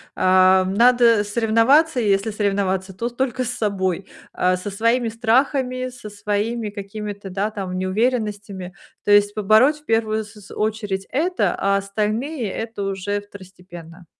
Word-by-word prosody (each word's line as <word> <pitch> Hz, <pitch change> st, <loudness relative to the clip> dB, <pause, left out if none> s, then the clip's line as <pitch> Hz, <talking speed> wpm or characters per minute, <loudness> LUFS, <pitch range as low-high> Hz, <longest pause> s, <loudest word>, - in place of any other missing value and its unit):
Ам, 185 Hz, 0 st, +4 dB
надо 235 Hz, -1 st, +5 dB
соревноваться, 235 Hz, +7 st, +3 dB
если 205 Hz, 0 st, +1 dB
соревноваться, 195 Hz, -2 st, -1 dB
то 235 Hz, +6 st, -3 dB
только 255 Hz, 0 st, -2 dB
с 235 Hz, -, -3 dB
собой. 195 Hz, -5 st, -2 dB, 0.3 s
А, 185 Hz, 0 st, +1 dB
со 195 Hz, +2 st, -6 dB
своими 230 Hz, +3 st, +1 dB
страхами, 255 Hz, +2 st, 0 dB
со 245 Hz, -4 st, -10 dB
своими 210 Hz, +2 st, -2 dB
какими-то, 205 Hz, 0 st, -7 dB
да, 200 Hz, +3 st, -2 dB
там 190 Hz, -3 st, -5 dB
неуверенностями. 205 Hz, -2 st, -2 dB, 0.3 s
То 205 Hz, -, 0 dB
есть 205 Hz, 0 st, +5 dB
побороть 220 Hz, +8 st, +4 dB
в 300 Hz, -, -28 dB
первую 220 Hz, -3 st, 0 dB
с 210 Hz, -, -14 dB
с 200 Hz, -, -15 dB
очередь 210 Hz, -3 st, -2 dB
это, 345 Hz, +7 st, 0 dB
а 200 Hz, 0 st, +1 dB
остальные 215 Hz, +6 st, -2 dB
это 225 Hz, -2 st, -5 dB
уже 195 Hz, +1 st, -2 dB
второстепенно. 180 Hz, -4 st, -13 dB
210 Hz, 140 wpm, -21 LUFS, 195-235 Hz, 0.3 s, надо